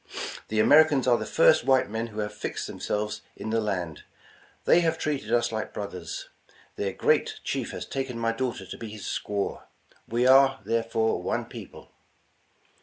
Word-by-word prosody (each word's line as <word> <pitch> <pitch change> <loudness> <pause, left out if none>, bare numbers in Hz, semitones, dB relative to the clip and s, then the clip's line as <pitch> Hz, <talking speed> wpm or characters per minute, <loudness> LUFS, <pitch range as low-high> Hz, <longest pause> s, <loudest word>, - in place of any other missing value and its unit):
The 110 - -1
Americans 145 +3 +6
are 120 -2 +4
the 110 - -4
first - - +5
white 130 0 +3
men 110 +2 -3
who 110 -1 -5
have 105 0 -4
fixed 105 - -4
themselves 105 +1 -3
in 110 - -5
the 115 0 +2
land. 90 -7 -3 0.6
They - - +6
have 165 -1 +1
treated 140 -9 -2
us 120 -1 +2
like 110 -1 -4
brothers. 90 -5 -5 0.5
Their 100 -1 -2
great - - +1
chief - - -2
has - - -6
taken 130 -3 -4
my 115 0 +1
daughter 115 -4 -3
to - - -8
be 115 - -6
his 105 -2 -9
squaw; 100 -1 -2 0.5
we 120 +2 +1
are, 135 +1 +6
there 115 +2 +1
fore, 115 0 0
one - - -1
people." - - -11
115 Hz, 175 wpm, -27 LUFS, 105-130 Hz, 0.6 s, Americans